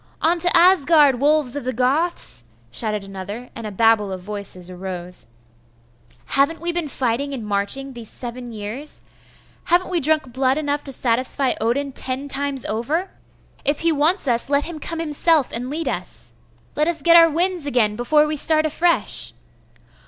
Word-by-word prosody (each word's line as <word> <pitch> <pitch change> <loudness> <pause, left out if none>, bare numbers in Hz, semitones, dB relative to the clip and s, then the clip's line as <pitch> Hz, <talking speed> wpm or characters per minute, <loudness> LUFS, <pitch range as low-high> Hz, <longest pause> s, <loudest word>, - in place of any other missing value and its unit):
On 340 +2 +2
to 355 0 +3
Asgard, 315 -6 +5
wolves 290 -3 +2
of 285 - -4
the 255 +1 -2
Goths!' 260 - 0 0.3
shouted 210 - -1
another; 195 +5 -8
and 230 -2 -6
a - - -6
babel 210 -1 +2
of 185 - -5
voices 195 -2 -4
arose. 180 -2 -7 1.0
'Haven't 280 +4 +1
we 345 +1 -2
been 340 -2 -3
fighting 270 +1 -2
and 230 -4 -6
marching 210 +7 -1
these 235 -3 -7
seven 245 0 -7
years?' 220 +7 -5 0.6
'Haven't 355 +2 +2
we 350 - +1
drunk 305 -4 +1
blood 260 +1 +1
enough 290 -1 -2
to 275 - -6
satisfy 255 +2 +1
Odin 270 +5 0
ten 260 +2 +1
times 280 -1 -1
over? 295 - -2 0.5
If 290 +1 0
he 335 0 +2
wants 310 +3 +1
us 240 +1 +1
lot 285 0 +2
him 330 -1 -7
come 330 +3 -5
himself 310 -2 +2
and 245 +2 -4
lead 315 +4 -4
us!' - - -5 0.4
'Let 300 +1 +1
us 330 -4 0
get 340 0 +6
our 335 -1 +8
winds 345 0 -1
again 225 -6 +2
before 300 +6 +3
we 305 0 -2
start 310 +1 +3
afresh! 325 -4 +1
275 Hz, 165 wpm, -21 LUFS, 230-310 Hz, 1.0 s, our